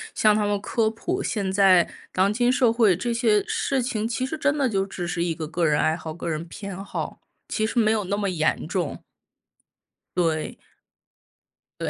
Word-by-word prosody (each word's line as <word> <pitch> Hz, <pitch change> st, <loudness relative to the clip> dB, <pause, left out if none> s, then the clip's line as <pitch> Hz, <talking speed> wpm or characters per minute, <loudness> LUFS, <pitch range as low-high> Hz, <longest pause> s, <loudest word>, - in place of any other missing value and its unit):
向 215 Hz, -1 st, +4 dB
他 210 Hz, -1 st, +1 dB
们 205 Hz, -1 st, 0 dB
科 220 Hz, +2 st, 0 dB
普， 350 Hz, -, -3 dB
现 200 Hz, -3 st, -1 dB
在 190 Hz, -3 st, +5 dB, 0.2 s
当 195 Hz, +2 st, +2 dB
今 245 Hz, +2 st, +2 dB
社 250 Hz, -3 st, +3 dB
会 220 Hz, -6 st, +4 dB
这 235 Hz, +7 st, -2 dB
些 225 Hz, -3 st, +3 dB
事 270 Hz, -2 st, 0 dB
情 220 Hz, -3 st, -1 dB
其 240 Hz, +2 st, -2 dB
实 270 Hz, -, -4 dB
真 295 Hz, -1 st, +1 dB
的 275 Hz, -3 st, +2 dB
就 195 Hz, -5 st, 0 dB
只 195 Hz, -2 st, -5 dB
是 175 Hz, -1 st, -1 dB
一 170 Hz, -2 st, -1 dB
个 155 Hz, -1 st, -5 dB
个 165 Hz, +1 st, 0 dB
人 150 Hz, -1 st, +2 dB
爱 155 Hz, -, +2 dB
好、 160 Hz, -1 st, -7 dB
个 170 Hz, +2 st, -6 dB
人 160 Hz, -1 st, -2 dB
偏 195 Hz, +2 st, -7 dB
好， 200 Hz, -, -5 dB, 0.3 s
其 215 Hz, -, 0 dB
实 225 Hz, -, -5 dB
没 220 Hz, -2 st, +4 dB
有 215 Hz, -2 st, 0 dB
那 200 Hz, +2 st, -1 dB
么 200 Hz, -2 st, -1 dB
严 155 Hz, -3 st, 0 dB
重。 175 Hz, -4 st, -3 dB, 1.1 s
对。 165 Hz, -3 st, 0 dB, 1.2 s
对， -, -, -1 dB
200 Hz, 210 characters per minute, -24 LUFS, 175-230 Hz, 1.2 s, 在